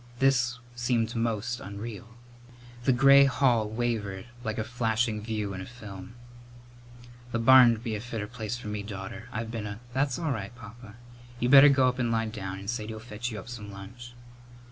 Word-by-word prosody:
This 125 Hz, -2 st, +2 dB, 0.2 s
seemed 120 Hz, -1 st, 0 dB
most 115 Hz, +1 st, -1 dB
unreal. 105 Hz, +2 st, -8 dB, 0.7 s
The 135 Hz, -, +5 dB
gray 140 Hz, +2 st, +7 dB
hall 125 Hz, -5 st, +2 dB
wavered 110 Hz, -4 st, -2 dB, 0.2 s
like 110 Hz, -2 st, -3 dB
a 110 Hz, -, 0 dB
flashing 110 Hz, -1 st, -1 dB
view 105 Hz, -2 st, -3 dB
in 95 Hz, -, -6 dB
a -, -, -6 dB
film. 105 Hz, -2 st, -10 dB, 1.2 s
"The 115 Hz, -, 0 dB
barn'd 120 Hz, -1 st, +6 dB
be 115 Hz, -3 st, -3 dB
a 105 Hz, -, -3 dB
fitter 115 Hz, -3 st, -4 dB
place 110 Hz, 0 st, -5 dB
for 120 Hz, -, -9 dB
me, 105 Hz, 0 st, -3 dB
daughter. 100 Hz, +2 st, -7 dB
I've 115 Hz, 0 st, -4 dB
been 110 Hz, -3 st, -4 dB
a 100 Hz, +1 st, -7 dB
" 120 Hz, -, -21 dB
"That's 135 Hz, 0 st, 0 dB
all 160 Hz, -3 st, -1 dB
right, 110 Hz, -2 st, -4 dB
Papa. 115 Hz, -1 st, -12 dB, 0.4 s
You 120 Hz, -, +1 dB
better 140 Hz, +2 st, +9 dB
go 135 Hz, -2 st, +4 dB
up 125 Hz, 0 st, -1 dB
and 120 Hz, -2 st, +1 dB
lie 115 Hz, 0 st, +1 dB
down, 100 Hz, -4 st, -5 dB
and 100 Hz, +1 st, -9 dB
Sadie'll 110 Hz, -1 st, -3 dB
fetch 110 Hz, +1 st, -5 dB
you 110 Hz, -, -6 dB
up 100 Hz, -, -9 dB
some 110 Hz, -4 st, -8 dB
lunch." 120 Hz, +5 st, -10 dB
115 Hz, 190 wpm, -28 LUFS, 105-120 Hz, 1.2 s, better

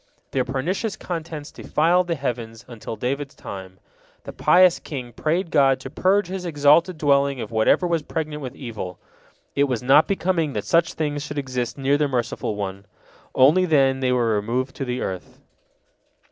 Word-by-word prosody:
Their 130 Hz, -, +1 dB
pernicious 175 Hz, -, -2 dB
contents 160 Hz, -4 st, -6 dB
defiled 175 Hz, +3 st, +1 dB
the 170 Hz, -, 0 dB
heavens 120 Hz, -5 st, -5 dB
until 115 Hz, -2 st, -7 dB
David's 140 Hz, +4 st, -3 dB
time. 95 Hz, -1 st, -9 dB, 0.5 s
The -, -, -8 dB
pious 180 Hz, -1 st, +5 dB
king 125 Hz, -5 st, -7 dB
prayed 165 Hz, -, -1 dB
God 135 Hz, -3 st, +4 dB
to 135 Hz, -, -8 dB
purge 195 Hz, +5 st, +2 dB
His 185 Hz, 0 st, -5 dB
exalted 160 Hz, +2 st, +3 dB
dwelling 140 Hz, -2 st, +2 dB
of -, -, -6 dB
whatever 110 Hz, +10 st, +3 dB
was 170 Hz, -2 st, 0 dB
pregnant 150 Hz, 0 st, -4 dB
with 130 Hz, -3 st, -6 dB
evil; 110 Hz, -8 st, -6 dB, 0.6 s
it 140 Hz, -, +3 dB
was 125 Hz, -4 st, -2 dB
not 140 Hz, +5 st, +5 dB
becoming 175 Hz, -6 st, 0 dB
that 105 Hz, -3 st, -3 dB
such 170 Hz, 0 st, +2 dB
things 145 Hz, -2 st, -2 dB
should 145 Hz, 0 st, -6 dB
exist 130 Hz, -3 st, -3 dB
near 140 Hz, +1 st, +1 dB
the 150 Hz, -, +2 dB
Merciful 120 Hz, -4 st, -2 dB
One. 100 Hz, -1 st, -5 dB, 0.5 s
Only 155 Hz, +8 st, +5 dB
then 135 Hz, -5 st, +3 dB
they 130 Hz, -1 st, +1 dB
were 120 Hz, -3 st, +2 dB
removed 120 Hz, +6 st, -2 dB
to 135 Hz, -, -3 dB
the 125 Hz, 0 st, -3 dB
earth. 95 Hz, -1 st, -6 dB
140 Hz, 170 wpm, -23 LUFS, 125-160 Hz, 0.6 s, pious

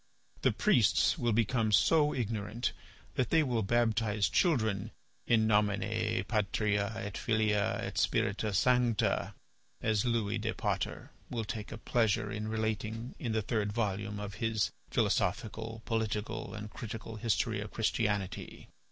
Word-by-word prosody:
The -, -, +4 dB
priests -, -, +3 dB
will 120 Hz, -1 st, +1 dB
become 110 Hz, 0 st, +2 dB
so 150 Hz, +7 st, +4 dB
ignorant 110 Hz, -1 st, -2 dB, 0.4 s
that 125 Hz, -, 0 dB
they 160 Hz, -1 st, +4 dB
will 120 Hz, -5 st, 0 dB
baptize 110 Hz, -1 st, +1 dB
children 110 Hz, -, +1 dB, 0.4 s
in 110 Hz, -2 st, +4 dB
nomine 105 Hz, -1 st, +1 dB
patria 105 Hz, -1 st, 0 dB
et 100 Hz, -2 st, -5 dB
filia 110 Hz, -2 st, +1 dB
et -, -, -5 dB
spirita 105 Hz, +2 st, +1 dB
sancta, 125 Hz, 0 st, +2 dB, 0.4 s
as 110 Hz, -2 st, +1 dB
Louis 115 Hz, -3 st, 0 dB
de 110 Hz, +1 st, -2 dB
Potter -, -, -2 dB, 0.2 s
will 115 Hz, -2 st, -3 dB
take 105 Hz, 0 st, -5 dB
a 110 Hz, -, -5 dB
pleasure 110 Hz, -2 st, +1 dB
in 105 Hz, +1 st, -3 dB
relating 110 Hz, +1 st, -2 dB
in 115 Hz, -3 st, -2 dB
the 110 Hz, -1 st, 0 dB
third 105 Hz, -2 st, -1 dB
volume 105 Hz, -2 st, -2 dB
of 105 Hz, -1 st, -5 dB
his 115 Hz, -2 st, +1 dB, 0.2 s
'Philosophical, 110 Hz, +3 st, -1 dB
Political, 110 Hz, 0 st, -2 dB
and 105 Hz, 0 st, -7 dB
Critical 110 Hz, 0 st, -7 dB
History 110 Hz, -1 st, 0 dB
of 105 Hz, -, -6 dB
Christianity. 105 Hz, -4 st, -2 dB
110 Hz, 135 wpm, -32 LUFS, 105-115 Hz, 0.4 s, The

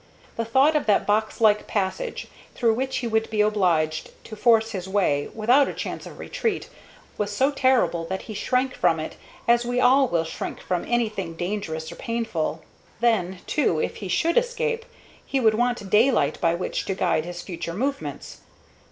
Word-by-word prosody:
The 230 Hz, -, -2 dB
thought 265 Hz, +7 st, +4 dB
of 300 Hz, -, 0 dB
that 205 Hz, -, +3 dB
box 215 Hz, +1 st, 0 dB
like 210 Hz, -2 st, +4 dB
passage, 210 Hz, -, -2 dB, 0.3 s
through 230 Hz, -2 st, +3 dB
which 260 Hz, +2 st, -2 dB
he 250 Hz, -2 st, -2 dB
would 220 Hz, 0 st, 0 dB
be 215 Hz, -1 st, +1 dB
obliged 175 Hz, -7 st, +1 dB
to 215 Hz, -, -9 dB
force 225 Hz, 0 st, +3 dB
his 190 Hz, -3 st, -5 dB
way 180 Hz, -8 st, +1 dB
without 245 Hz, +6 st, +4 dB
a -, -, -5 dB
chance -, -, -5 dB
of -, -, -11 dB
retreat, 470 Hz, -5 st, -3 dB, 0.5 s
was 205 Hz, -1 st, 0 dB
so 260 Hz, +7 st, +2 dB
terrible 260 Hz, -11 st, +2 dB
that 190 Hz, +3 st, -4 dB
he 215 Hz, -, -8 dB
shrank 255 Hz, +4 st, 0 dB
from 170 Hz, -2 st, +2 dB
it 155 Hz, -, -5 dB, 0.3 s
as 235 Hz, 0 st, +4 dB
we 245 Hz, +1 st, -1 dB
all 250 Hz, -9 st, +4 dB
shrink 165 Hz, -, -5 dB
from 180 Hz, -2 st, -2 dB
anything 215 Hz, -8 st, -1 dB
dangerous 170 Hz, -3 st, -4 dB
or 170 Hz, -, -10 dB
painful. 225 Hz, -9 st, -2 dB, 0.4 s
Then, 190 Hz, -6 st, +1 dB
too, 235 Hz, -, +1 dB
if -, -, -2 dB
he 200 Hz, -, -6 dB
should 330 Hz, -, +3 dB
escape, 480 Hz, -1 st, -2 dB, 0.4 s
he 275 Hz, -, -1 dB
would 220 Hz, -3 st, +4 dB
want 240 Hz, -2 st, 0 dB
daylight 210 Hz, -, +3 dB
by 165 Hz, 0 st, +3 dB
which 180 Hz, -, -3 dB
to 195 Hz, -, -2 dB
guide 175 Hz, -4 st, +1 dB
his 175 Hz, 0 st, -6 dB
future 170 Hz, -2 st, -5 dB
movements. 275 Hz, +6 st, -4 dB
215 Hz, 180 wpm, -24 LUFS, 180-250 Hz, 0.5 s, thought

